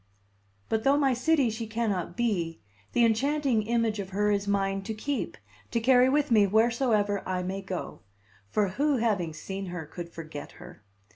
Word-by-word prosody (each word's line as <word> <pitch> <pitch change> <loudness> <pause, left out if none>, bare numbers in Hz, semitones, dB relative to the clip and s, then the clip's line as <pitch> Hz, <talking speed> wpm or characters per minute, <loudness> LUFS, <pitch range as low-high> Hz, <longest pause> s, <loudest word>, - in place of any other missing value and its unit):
But 220 0 0
though 275 +3 +4
my 275 -3 +3
city 265 -1 +2
she 225 +1 -5
cannot 210 -6 -2
be, 180 -9 -1 0.3
the 240 - +5
enchanting 270 +1 +2
image 225 -1 0
of 190 -2 -4
her 205 +2 +1
is 200 0 0
mine 195 -1 0
to 215 +3 -5
keep, 280 +6 -3 0.3
to 235 - 0
carry 250 +2 +5
with 290 -1 +1
me 210 -3 +6
wheresoever 220 -2 +2
I 180 -1 -1
may 190 +2 -3
go; 190 -2 -5 0.5
for 205 - +1
who, 285 +7 +1
having 205 -8 0
seen 190 +5 -6
her, 175 -2 -5
could 170 +3 -8
forget 155 -3 -8
her? 175 -9 -13
215 Hz, 170 wpm, -28 LUFS, 190-240 Hz, 0.5 s, me